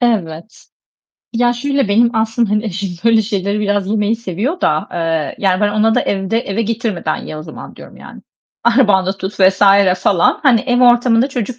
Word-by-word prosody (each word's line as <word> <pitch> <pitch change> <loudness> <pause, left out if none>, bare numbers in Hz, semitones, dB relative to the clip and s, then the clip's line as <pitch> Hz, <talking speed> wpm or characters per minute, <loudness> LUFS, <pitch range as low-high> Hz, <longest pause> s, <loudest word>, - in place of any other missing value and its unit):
Evet. 200 -6 -3 0.7
Ya 240 +1 +1
şöyle, 275 0 -1
benim 230 +4 +3
aslında 225 0 0
hani 210 +1 0
eşim 200 -1 -4
böyle 225 -1 +4
şeyleri 200 -1 -2
biraz 205 -2 -1
yemeyi 215 +1 0
seviyor 230 - -4
da; 155 0 0
eee, 165 -3 -2
yani 185 -2 0
ben 210 - +2
ona 215 +2 +1
da - - +2
evde 195 +3 -2
eve 225 -1 -3
getirmeden 220 -7 -3
ye 155 - -7
o 155 - -7
zaman 155 0 -11
diyorum - - -14
yani. - - -13 0.4
Arabanda 210 -6 +3
tut 190 +2 -6
vs. 190 +1 +3 0.4
falan. 180 -2 +1
Hani 255 -6 +4
ev 245 -2 0
ortamında 240 0 +3
çocuk 250 -2 -5
215 Hz, 175 wpm, -15 LUFS, 190-235 Hz, 0.7 s, böyle